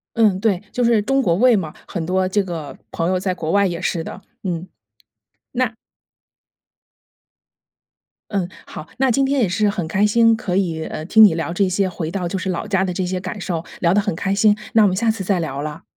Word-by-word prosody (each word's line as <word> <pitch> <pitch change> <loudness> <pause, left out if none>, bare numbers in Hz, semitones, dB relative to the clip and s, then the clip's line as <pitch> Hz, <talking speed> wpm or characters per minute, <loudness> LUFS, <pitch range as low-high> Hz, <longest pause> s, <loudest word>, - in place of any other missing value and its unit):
嗯， 215 -5 +3
对， 200 -4 +1
就 250 - 0
是 230 -2 +4
中 270 +5 +1
国 170 -8 +2
胃 245 +3 +5
嘛， 160 -6 -3 0.2
很 175 -4 -3
多 185 +2 0
这 205 +2 +1
个 160 -7 -6
朋 165 - -1
友 185 0 +1
在 185 0 -1
国 160 -3 -4
外 200 +2 +3
也 170 -2 -3
是 170 -2 -1
的， 185 - -8 0.2
嗯， 180 -2 -3 0.8
那 255 -2 0 2.6
嗯， 195 -4 -1 0.2
好， 155 - -9
那 265 0 +3
今 270 +3 +2
天 275 0 +1
也 210 - +2
是 205 +4 +1
很 190 -4 -2
开 190 +6 +2
心 230 +1 +4
可 205 -5 -2
以， 165 -5 -1
呃， 155 - -6
听 220 +6 +5
你 200 - +6
聊 165 +1 -3
这 190 +2 +1
些 190 +1 +1
回 165 -3 -4
到 180 0 -3
就 190 +3 -2
是 190 - -4
老 180 +4 -3
家 195 -2 +1
的 185 - -2
这 185 - -1
些 180 0 -2
感 185 +2 -6
受， 170 -3 -3 0.2
聊 170 -1 +3
得 205 - +4
很 205 -3 -2
开 195 +3 -1
心， 210 +1 +4 0.2
那 220 - +5
我 - - +6
们 185 - -1
下 230 +3 +2
次 220 -3 -2
再 190 0 +1
聊 140 -4 -3
了。 150 0 -6
190 Hz, 240 characters per minute, -20 LUFS, 175-210 Hz, 2.6 s, 你